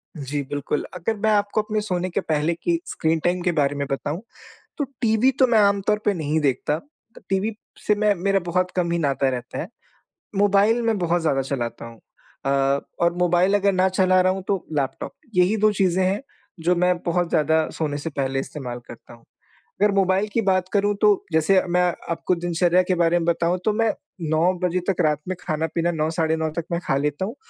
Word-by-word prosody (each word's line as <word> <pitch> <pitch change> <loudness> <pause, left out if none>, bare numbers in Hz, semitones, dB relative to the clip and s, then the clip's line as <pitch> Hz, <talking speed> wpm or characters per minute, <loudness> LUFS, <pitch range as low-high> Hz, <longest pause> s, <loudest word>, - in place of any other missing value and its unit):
जी, 145 0 -3
बिल्कुल। 145 +1 -2
अगर 180 +6 -2
मैं 220 - +4
आपको 205 +1 +1
अपने 215 0 -2
सोने 185 -3 -2
के 190 - -1
पहले 155 +1 0
की 335 - -1
स्क्रीन 160 0 0
टाइम 175 +1 +1
के 175 - +1
बारे 140 +1 +1
में 140 0 -2
बताऊँ 145 +6 -3 0.6
तो 290 - 0 0.2
टीवी 230 +3 +3
तो 260 - +6
मैं 230 -3 +4
आम 200 -1 +3
तौर 210 0 +2
पे 205 - +3
नहीं 155 -3 -1
देखता। 145 +2 0 0.5
टीवी 200 +3 0 0.3
से 210 - +4
मैं 210 0 +2
मेरा 195 +2 +1
बहुत 180 +1 0
कम 175 -2 0
ही 170 - +1
नाता 140 -2 +1
रहता 125 -1 -5
है। 170 - -4 0.7
मोबाइल 205 +3 +3
मैं 225 -2 +1
बहुत 175 0 +1
ज़्यादा 140 -4 +1
चलाता 125 -4 -4
हूँ। 115 -1 -12 0.5
अ, 135 - +1 0.5
और 170 0 +3
मोबाइल 180 +3 +3
अगर 200 0 +3
ना 185 0 +3
चला 185 0 +3
रहा 185 0 +3
हूँ 190 -1 -6
तो 195 -3 -1
लैपटॉप। 135 -3 -2 0.2
यही 180 +4 +3
2 215 0 +4
चीज़ें 190 -2 +2
हैं 195 +5 0 0.4
जो 180 +2 +3
मैं 180 +1 +2
बहुत 175 0 0
ज़्यादा 160 0 +2
सोने 150 -3 -1
से 155 +3 -4
पहले 135 -2 -2
इस्तेमाल 125 -4 -6
करता 120 0 -12
हूँ। 115 -1 -17 0.6
अगर 210 0 +4
मोबाइल 195 +1 +2
की 230 - +2
बात 185 -2 +1
करूँ 205 0 +2
तो 210 -2 +3
जैसे 160 +4 +4
मैं 180 +1 +2 0.3
आपको 170 +2 0
दिनचर्या 175 +1 +2
के 185 0 0
बारे 170 0 +3
में 165 - -2
बताऊँ 170 +1 +1
तो 215 - +2
मैं 225 +1 +1 0.4
9 165 +4 +3
बजे 180 +1 +1
तक 190 -2 0
रात 150 -1 +2
में 185 - -2
खाना-पीना, 160 0 -1
साढ़े 160 -1 0
9 160 0 -1
तक 170 - -2
मैं 170 - 0
खा 135 - +1
लेता 150 +5 -1
हूँ 225 +6 -5
175 Hz, 205 wpm, -23 LUFS, 155-195 Hz, 0.7 s, तो